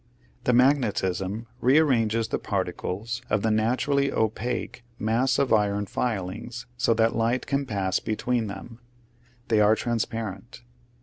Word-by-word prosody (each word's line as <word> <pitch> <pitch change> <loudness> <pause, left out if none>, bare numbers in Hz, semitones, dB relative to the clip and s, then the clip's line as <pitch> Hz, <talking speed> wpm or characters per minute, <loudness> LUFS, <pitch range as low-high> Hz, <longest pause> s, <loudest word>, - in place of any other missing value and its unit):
The 125 - +3
magnetism 110 -6 +2
rearranges 125 -6 +3
the - - -1
par - - -1
ticles 110 +5 -4
of 105 -1 +1
the 110 - +2
naturally 130 +6 +1
opaque 110 +2 -2
mass 115 +4 +1
of 135 -4 +2
iron 105 -1 +2
filings 110 +3 -3
so 120 -2 +2
that 115 0 +2
light 115 +2 +1
can 140 0 -1
pass 95 -4 0
between 115 +1 -1
them: 105 +4 -8 0.7
they 110 -2 +4
are 105 +1 +5
transparent. 115 0 -4
115 Hz, 130 wpm, -26 LUFS, 105-125 Hz, 0.7 s, are